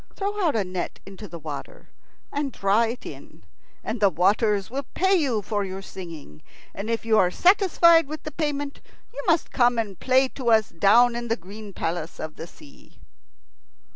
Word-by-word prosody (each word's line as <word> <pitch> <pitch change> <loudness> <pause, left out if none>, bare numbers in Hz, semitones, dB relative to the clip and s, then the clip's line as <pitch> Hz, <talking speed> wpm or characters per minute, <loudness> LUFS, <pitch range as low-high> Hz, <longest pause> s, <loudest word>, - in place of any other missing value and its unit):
Throw 410 +1 -3
out 315 -7 +2
a 215 - +1
net 185 -1 -5
into 195 +2 -10
the 170 - -8
water, 150 -3 -8 0.4
and 285 -1 -2
draw 200 +1 +2
it 235 +2 -2
in, - - -11 0.4
and 220 +1 -3
the 200 - +6
waters 200 +2 +2
will 275 0 -4
pay 380 +1 +3
you 260 - 0
for 210 -1 -2
your 190 0 -6
singing. 165 - -10 0.3
And 200 +3 -6
if 230 0 -2
you 220 -1 +4
are 180 - +4
satisfied 340 - +4
with 310 +1 -7
the 305 - -6
payment, 290 -2 -3 0.3
you - - -5
must 330 -2 +2
come 245 -2 +3
and 205 -5 -3
play 260 +1 +3
to 255 -3 -3
us 220 -2 +4
down 230 +8 +4
in 240 0 -4
the 225 - +1
green 200 +4 -10
palace 165 -2 -4
of 155 0 -6
the 165 - -8
sea." 280 - -18
225 Hz, 185 wpm, -24 LUFS, 195-280 Hz, 0.4 s, the